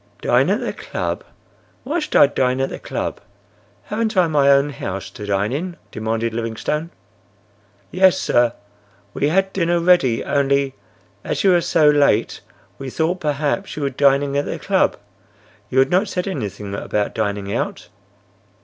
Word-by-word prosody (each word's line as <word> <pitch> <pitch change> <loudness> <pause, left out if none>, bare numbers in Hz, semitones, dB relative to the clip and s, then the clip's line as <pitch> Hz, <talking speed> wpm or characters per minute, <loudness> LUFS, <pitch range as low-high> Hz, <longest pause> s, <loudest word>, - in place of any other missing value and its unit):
"Dine - - +3
at - - +1
the - - -3
club! - - -4 0.6
Why 305 +6 -1
should 300 - -5
I - - +8
dine 130 -2 0
at 135 - 0
the - - -6
club? - - -4 0.6
Haven't 220 0 -2
I 180 - +5
my 145 -3 +3
own 140 +1 +4
house 100 -7 -5
to 105 - -8
dine 100 +2 0
in?" 175 +4 -4
demanded 110 +1 -2
Livingstone. 115 +8 -3 1.0
"Yes, 190 0 +4
sir. 120 -1 +2 0.6
We 145 - 0
had 190 +3 +1
dinner 175 -2 +1
ready, 170 -9 +3
only—as 130 -9 -2
you 195 - +5
were 175 -1 +4
so 155 -2 +3
late 145 -1 +3 0.4
we 135 -1 -5
thought 165 +7 -1
perhaps 150 +5 -2
you 150 - -3
were 140 - 0
dining 140 +1 +2
at 145 - -2
the - - -4
club. - - +1 0.7
You 130 - -3
had 135 0 +4
not 185 +4 +3
said 180 -1 -3
anything 105 - -5
about 105 +1 -2
dining 100 -2 -2
out." - - -3
140 Hz, 160 wpm, -20 LUFS, 115-175 Hz, 1.0 s, I